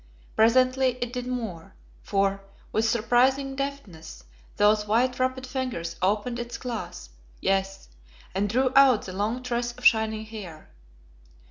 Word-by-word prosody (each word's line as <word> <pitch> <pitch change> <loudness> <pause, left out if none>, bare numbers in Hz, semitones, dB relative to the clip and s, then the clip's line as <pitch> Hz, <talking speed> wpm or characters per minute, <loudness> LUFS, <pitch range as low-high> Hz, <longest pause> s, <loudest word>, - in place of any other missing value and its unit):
Presently 255 +3 +3
it 245 0 -4
did 250 -1 -4
more, 225 -10 -5 0.3
for, 195 0 0 0.3
with 225 +1 +1
surprising 255 +4 +2
deftness 245 - -6 0.3
those 210 0 +3
white 245 +4 +1
wrapped 260 0 -1
fingers 250 -11 -4
opened 210 +6 0
its 240 0 -5
clasp, 225 - -6 0.3
yes, 195 0 -1 0.5
and 200 +2 0
drew 255 +4 +2
out 270 -5 +6
the 185 - -7
long 215 +6 -2
tress 240 -1 -2
of - - -12
shining 220 -1 +3
hair. 195 -8 -10
230 Hz, 130 wpm, -26 LUFS, 200-255 Hz, 0.5 s, out